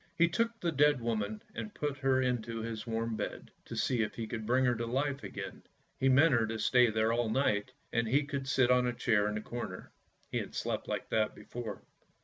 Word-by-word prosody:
He 170 - +6
took 230 +6 0
the 170 - 0
dead 145 -1 +4
woman 110 -2 -2
and 215 - -6
put 145 -2 -2
her 135 -1 +3
into 120 -2 -1
his 110 -1 -5
warm 115 0 -1
bed, - - -5
to - - -7
see 125 -3 +1
if 105 - -2
he 115 - -3
could 110 -1 -5
bring 130 +2 +3
her 125 - +4
to 115 0 -3
life 135 +3 -1
again. - - -6 0.4
He 135 - +3
meant 140 +4 +6
her 115 -2 +3
to 110 +1 -3
stay 125 +1 +4
there 110 +1 +2
all 120 -1 +1
night, 110 -2 +1 0.2
and 115 0 +1
he 140 +5 +2
would 135 -1 -2
sit 130 -2 +3
on 125 0 +4
a 125 - 0
chair 110 -3 +2
in 105 - -2
the 105 - -2
corner; 115 -5 -6 0.4
he - - 0
had - - -6
slept - - -2
like - - -3
that 110 -1 +1
before. 115 -5 -7
120 Hz, 225 wpm, -32 LUFS, 110-135 Hz, 0.4 s, He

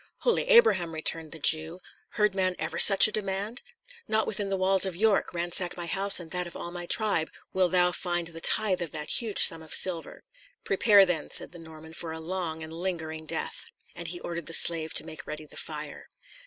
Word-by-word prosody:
"Holy 480 - +1
Abraham!" 450 - +4
returned 160 0 -1
the 160 - -7
Jew, 160 +3 +2 0.3
"heard 210 -2 +1
man 185 -1 -1
ever 160 +1 -5
such 195 0 +8
a - - -6
demand? 205 +3 -4 0.5
Not 220 0 0
within 205 -1 -3
the 195 - -1
walls 190 0 +4
of 190 -3 +1
York, 210 +1 +1
ransack 175 +1 -2
my 175 - -5
house 195 +3 +3
and 165 -2 -11
that 180 -1 -3
of 170 - -13
all 170 - -7
my 175 0 -7
tribe, 200 -8 +1 0.2
wilt 185 -2 +1
thou 180 -1 +3
find 175 -2 -3
the 165 0 -10
tithe 190 -2 +2
of 165 -4 -4
that 150 +8 -1
huge 220 -4 +1
sum 165 -1 +5
of 160 - -1
silver." 175 -3 -3 0.4
"Prepare, 200 0 +4
then," 180 -3 -3
said - - 0
the 175 - -12
Norman, 160 -1 -13
"for 165 0 -7
a 160 - -8
long 160 -1 -5
and 160 0 -10
lingering 160 -3 -5
death." - - -5 0.3
And 170 - -9
he 175 +1 -4
ordered 170 -2 -6
the 165 - -1
slave 160 -2 +3
to - - +1
make 155 - -10
ready 155 0 -7
the - - -15
fire. - - -7
175 Hz, 210 wpm, -27 LUFS, 160-195 Hz, 0.5 s, such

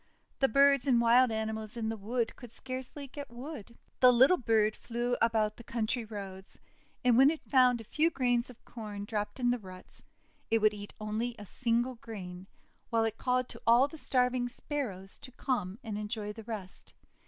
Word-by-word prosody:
The 270 - +4
birds 275 +2 +4
and 245 -3 +5
wild 240 +2 +5
animals 220 0 -3
in 220 -1 -1
the 225 - -2
wood 225 +3 -2
could 240 -2 -12
scarcely 260 +2 -6
get 280 +2 -8
food. 240 -2 -9 0.2
The 250 -1 +8
little 260 +8 +6
bird 220 -3 +2
flew 240 +1 -2
about 220 -2 +2
the 235 - -11
country 230 +1 -2
roads, 195 -3 -8 0.5
and, 245 -2 +5
when 270 +1 +8
it 320 0 -3
found 250 -3 +4
a - - -8
few 305 +9 +1
grains 245 -5 +1
of 245 - -15
Corn 210 -3 -7
dropped 210 +3 -3
in 245 -1 +3
the 245 - 0
ruts, 185 -3 -11 0.5
it 225 - +4
would 215 -1 +4
eat 205 -1 -9
only 220 +3 -2
a 210 - -9
single 240 +3 0
grain, 190 -5 -8 0.4
while 230 -1 +2
it 225 0 -2
called 255 0 +1
to - - -11
all 240 +4 +6
the 320 +1 -11
starving 250 -2 +1
Sparrows 230 -8 -5
to 255 - -12
come 205 -8 -2
and 215 -3 -4
enjoy 210 0 -4
the 225 0 -10
rest. 210 -5 -7
235 Hz, 190 wpm, -31 LUFS, 215-255 Hz, 0.5 s, The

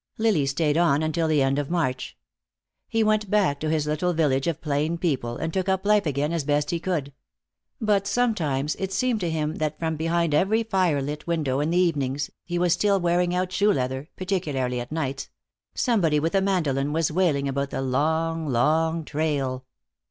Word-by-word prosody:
Lily 210 -11 +2
stayed 150 +2 +1
on 155 -3 +3
until 155 +1 0
the 150 -3 +3
end 135 +1 +1
of 145 - -3
March. 155 -7 -2 0.7
He 225 -1 +1
went 215 -1 +1
back 185 -9 +2
to 155 - -2
his 155 -1 +1
little 155 +4 0
village 145 -4 +1
of 165 -2 -1
plain 155 +2 -1
people, 130 -9 -1
and 160 0 -3
took 190 0 -1
up 190 +1 0
life 210 -3 +3
again 145 +3 -1
as 165 -3 -1
best 145 +1 0
he 170 - -1
could. 155 -6 -2 0.7
But 205 -4 +1
sometimes 155 - 0
it 190 -1 -3
seemed 230 +4 0
to 175 -4 -1
him 155 -1 -2
that 155 -1 -2
from 160 -1 -2
behind 165 0 0
every 210 +9 +2
fire 185 -10 +1
lit 150 +3 -5
window 150 -6 0
in 150 +2 0
the 175 - +1
evenings 145 -6 0
he 175 0 -3
was 175 -1 +3
still 200 -1 +2
wearing 175 0 +1
out 180 0 -1
shoe 205 +2 +3
leather, 130 0 -2
particularly 150 -10 -2
at 120 +2 -7
nights 140 -3 -3 0.5
somebody 175 - +2
with 165 +2 -1
a 195 - +3
mandolin 150 -8 0
was 165 -1 +1
wailing 155 -5 +1
about 140 0 -2
the 135 - -3
long, 160 +4 0
long 160 +6 +1
trail. 140 -4 -2
160 Hz, 190 wpm, -25 LUFS, 145-180 Hz, 0.7 s, on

